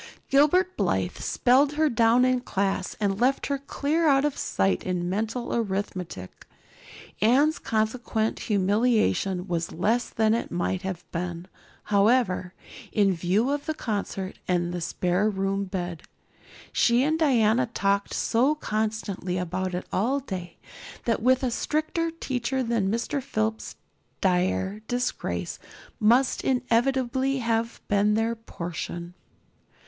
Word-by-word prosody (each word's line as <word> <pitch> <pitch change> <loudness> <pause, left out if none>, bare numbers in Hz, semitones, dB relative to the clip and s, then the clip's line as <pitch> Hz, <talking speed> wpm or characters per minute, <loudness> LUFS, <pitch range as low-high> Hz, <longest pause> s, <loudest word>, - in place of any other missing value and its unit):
Gilbert 355 +7 +4
Blythe - - 0
spelled 270 +4 +3
her 310 +1 +2
down 235 -1 +4
in 255 0 +2
class 195 -5 -2
and 200 0 0
left 265 +2 +2
her 280 -1 -1
clear 300 +4 0
out 275 -1 +4
of 295 - 0
sight 195 - 0
in 180 -1 -2
mental 220 +6 -2
arithmetic. 190 - -4 0.7
Anne's 275 +8 +4
consequent 220 0 -1
humiliation 200 -2 +1
was 170 -2 -2
less 220 +7 0
than 220 -1 +2
it 230 - -1
might 180 +1 -1
have 185 -3 -5
been, 170 0 -4 0.4
however, 200 -3 +2 0.4
in 200 -2 +3
view 185 +9 +1
of 290 +1 -3
the 315 - -1
concert 200 -6 -4
and 175 -1 0
the 175 - -3
spare 180 +5 0
room 195 0 -1
bed. 180 -4 -4 0.7
She 240 +1 +4
and 315 +3 +1
Diana 240 -6 +3
talked 200 -3 0
so 255 +6 +2
constantly 215 -7 -2
about 180 +1 -2
it 180 - -4
all 250 +9 +1
day 185 -9 -7 0.5
that 230 -2 +1
with 255 +3 +3
a 250 - +1
stricter 310 +6 -1
teacher 265 -5 -2
than 230 -5 0
Mr. 235 +6 -1
Phillips 220 -3 -2 0.4
dire 190 +2 0
disgrace 245 0 -2 0.4
must 240 +4 +3
inevitably 260 +1 +1
have 230 -1 -1
been 205 +1 +3
their 225 +1 +1
portion. 175 -5 -6
220 Hz, 130 wpm, -26 LUFS, 190-255 Hz, 0.7 s, Gilbert